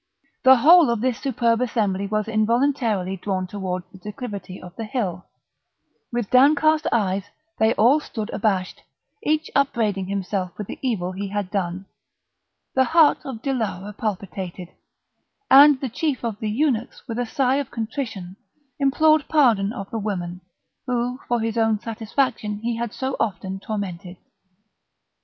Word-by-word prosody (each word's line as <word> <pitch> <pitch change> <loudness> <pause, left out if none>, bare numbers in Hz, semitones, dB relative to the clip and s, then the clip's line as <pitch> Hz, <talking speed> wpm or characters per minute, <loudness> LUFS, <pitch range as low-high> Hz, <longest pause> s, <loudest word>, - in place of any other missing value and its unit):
The 265 0 +8
whole 320 +4 +7
of 235 -2 0
this 255 -1 0
superb 235 -3 +1
assembly 205 -5 0
was 215 +1 -1
involuntarily 220 -3 +1
drawn 190 0 -2
towards 185 -2 -4
the 190 - -14
declivity 200 -3 -7
of 180 0 -12
the 225 - -5
hill; 195 -8 -3 0.9
with 240 -4 -3
downcast 305 +4 +4
eyes 195 -3 0 0.3
they 220 +1 +3
all 255 +8 +5
stood 225 -6 -6
abashed, 195 -4 -1 0.4
each 310 -3 0
upbraiding 220 -9 +1
himself 190 -2 -3
with 210 - -4
the - - -8
evil 205 -9 -1
he 195 +2 -4
had 200 -1 -3
done; 190 -1 -2 0.9
the 260 0 +3
heart 320 -1 +5
of 250 -4 -7
Dilara 210 -7 -2
palpitated, 190 -4 -5 0.8
and 280 +1 +8
the 265 - -2
chief 265 +3 -2
of 225 -3 -3
the 215 - -2
eunuchs 245 0 -1
with 230 -1 -4
a 245 - 0
sigh 265 +2 +1
of 285 -3 -3
contrition 220 -6 -5 0.4
implored 300 +2 +3
pardon 230 -10 +3
of 195 -3 -7
the 225 - -2
women, 180 -4 -4 0.5
whom 250 0 -1
for 240 -1 +1
his 225 +1 -1
own 225 -2 +2
satisfaction 225 -1 -2
he 235 0 -1
had 235 -1 -3
so 265 +3 -3
often 195 -3 -2
tormented. 190 -3 -5
220 Hz, 145 wpm, -23 LUFS, 195-255 Hz, 0.9 s, The